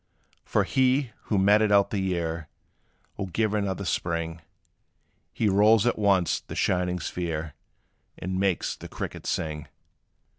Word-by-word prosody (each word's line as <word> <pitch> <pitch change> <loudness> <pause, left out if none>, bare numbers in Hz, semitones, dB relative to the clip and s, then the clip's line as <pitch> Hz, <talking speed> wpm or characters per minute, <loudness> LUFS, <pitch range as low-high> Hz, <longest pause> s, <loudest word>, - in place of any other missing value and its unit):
For - - +1
he, 130 -1 +2
who 105 - 0
meted 105 +2 +4
out 100 -1 +4
the 100 - -1
year, 85 -4 -2 0.7
Will 100 - -3
give 105 +4 0
another 100 -2 -1
spring: 85 -1 -2 0.9
He 110 - 0
rolls 105 +3 +5
at 120 - +1
once 95 -5 +3
the - - -9
shining 90 0 0
sphere, 80 -3 -4 0.6
And 95 +1 -3
makes 95 -3 0
the - - -10
cricket - - -6
sing. 75 -2 -2
95 Hz, 135 wpm, -26 LUFS, 85-105 Hz, 0.9 s, rolls